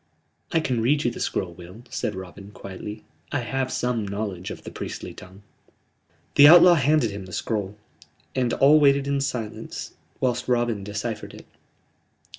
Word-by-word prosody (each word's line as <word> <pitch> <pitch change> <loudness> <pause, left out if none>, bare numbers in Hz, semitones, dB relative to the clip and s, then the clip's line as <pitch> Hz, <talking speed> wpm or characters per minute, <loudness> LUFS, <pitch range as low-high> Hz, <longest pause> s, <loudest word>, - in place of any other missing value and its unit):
"I 165 - +3
can 125 -6 -1
read 145 +6 +2
you 120 - +1
the - - -8
scroll, 90 -3 -2
Will," 90 +7 -12
said 105 - -2
Robin, 95 +1 -9
quietly. 105 +1 -8 0.3
"I 145 - 0
have 130 +2 -2
some 120 -4 -1
knowledge 100 -3 -4
of - - -8
the - - -8
priestly - - -6
tongue." 95 +3 -14 0.9
The 145 - +9
outlaw 175 +2 +9
handed 145 -6 +2
him 100 -1 -7
the - - -11
scroll, 105 +1 -3 0.6
and 125 -2 0
all 145 +3 +6
waited 140 -1 +4
in 140 -1 0
silence 120 -6 -5 0.3
whilst 125 -1 -1
Robin 120 -4 0
deciphered 105 +2 -5
it. - - -13
115 Hz, 160 wpm, -24 LUFS, 100-135 Hz, 0.9 s, The